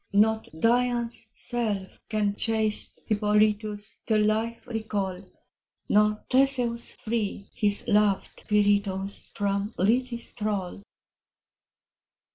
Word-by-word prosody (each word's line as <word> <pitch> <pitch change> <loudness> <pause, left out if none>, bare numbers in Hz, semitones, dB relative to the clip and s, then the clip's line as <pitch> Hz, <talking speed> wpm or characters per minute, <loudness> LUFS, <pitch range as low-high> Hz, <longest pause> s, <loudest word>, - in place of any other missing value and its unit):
Not 220 +2 +3
Dian's 240 0 +1
self 215 -6 -2
can 210 -2 0
chaste 220 -1 +2
Hippolytus 210 0 0
To 220 -2 +3
life 220 +2 0
recall, 205 -5 -3 0.7
Nor 210 0 +3
Theseus 255 -3 +1
free 215 -3 -3
his 205 0 +1
loved 210 -3 +1
Pirithous 200 -2 +1
From 200 +1 -1
Lethe's 235 +4 0
thrall. 205 -4 -3
215 Hz, 85 wpm, -26 LUFS, 205-230 Hz, 0.7 s, Not